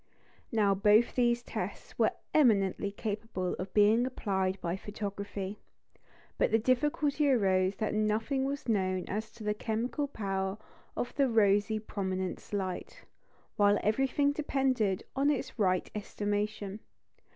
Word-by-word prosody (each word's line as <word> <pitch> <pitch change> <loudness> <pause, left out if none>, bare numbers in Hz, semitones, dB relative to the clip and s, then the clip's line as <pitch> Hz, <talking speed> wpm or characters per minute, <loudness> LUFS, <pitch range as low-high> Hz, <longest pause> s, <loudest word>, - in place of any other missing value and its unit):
Now 210 -4 +3
both 210 +4 +4
these 240 -1 +2
tests - - -6
were - - +3 0.2
eminently 200 -8 +3
capable 205 -3 -3
of 185 +1 -5
being 215 +4 +4
applied 190 -6 -1
by 170 0 -2
photography. 200 0 -5 0.8
But - - +3
the 225 - +4
difficulty 285 +4 +1
arose 190 -6 +3
that 215 - -2
nothing 215 +5 0
was 280 0 -4
known 185 -4 0
as 215 +2 -3
to 230 -1 -11
the 210 0 +1
chemical 230 +7 -2
power 195 -5 -2 0.4
of 245 - -2
the 275 -2 +2
rosy 210 -1 +3
prominence 190 -3 -4
light, 190 -3 -4 0.5
while 205 0 +5
everything 270 +6 +2
depended 265 -9 0
on 275 +2 +3
its 280 -4 -2
right 185 -3 +2
estimation. 205 -1 -3
210 Hz, 130 wpm, -31 LUFS, 195-240 Hz, 0.8 s, while